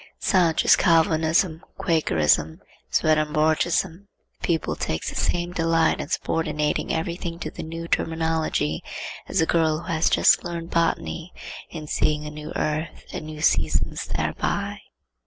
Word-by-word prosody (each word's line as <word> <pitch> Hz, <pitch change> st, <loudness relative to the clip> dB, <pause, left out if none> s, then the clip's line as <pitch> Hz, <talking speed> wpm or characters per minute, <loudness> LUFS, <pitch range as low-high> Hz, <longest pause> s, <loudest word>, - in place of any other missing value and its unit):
Such 175 Hz, -5 st, +2 dB
is -, -, +8 dB
Calvinism, 160 Hz, 0 st, +3 dB, 0.2 s
Quakerism, 80 Hz, -, +2 dB, 0.3 s
Swedenborgism. 155 Hz, +4 st, +1 dB, 0.3 s
The -, -, -25 dB
pupil 165 Hz, -3 st, 0 dB
takes 80 Hz, -, -3 dB
the -, -, -10 dB
same 175 Hz, 0 st, -1 dB
delight 165 Hz, -1 st, +2 dB
in -, -, -5 dB
subordinating 150 Hz, -2 st, -1 dB
every 165 Hz, +1 st, -1 dB
thing 170 Hz, -2 st, -5 dB
to 155 Hz, -3 st, -5 dB
the -, -, -7 dB
new 165 Hz, +1 st, -6 dB
terminology 160 Hz, -, 0 dB, 0.5 s
as 185 Hz, -, +1 dB
a -, -, +4 dB
girl 160 Hz, -1 st, +2 dB
who 170 Hz, 0 st, -4 dB
has 160 Hz, +1 st, +2 dB
just -, -, +4 dB
learned 170 Hz, -1 st, -5 dB
botany 165 Hz, +1 st, -1 dB, 0.4 s
in 155 Hz, -2 st, -7 dB
seeing 150 Hz, 0 st, 0 dB
a 150 Hz, -, -5 dB
new 150 Hz, 0 st, -8 dB
earth 155 Hz, +1 st, -2 dB
and 155 Hz, -, -5 dB
new 155 Hz, -1 st, -7 dB
seasons -, -, +1 dB
thereby. -, -, -2 dB
160 Hz, 140 wpm, -24 LUFS, 155-170 Hz, 0.5 s, is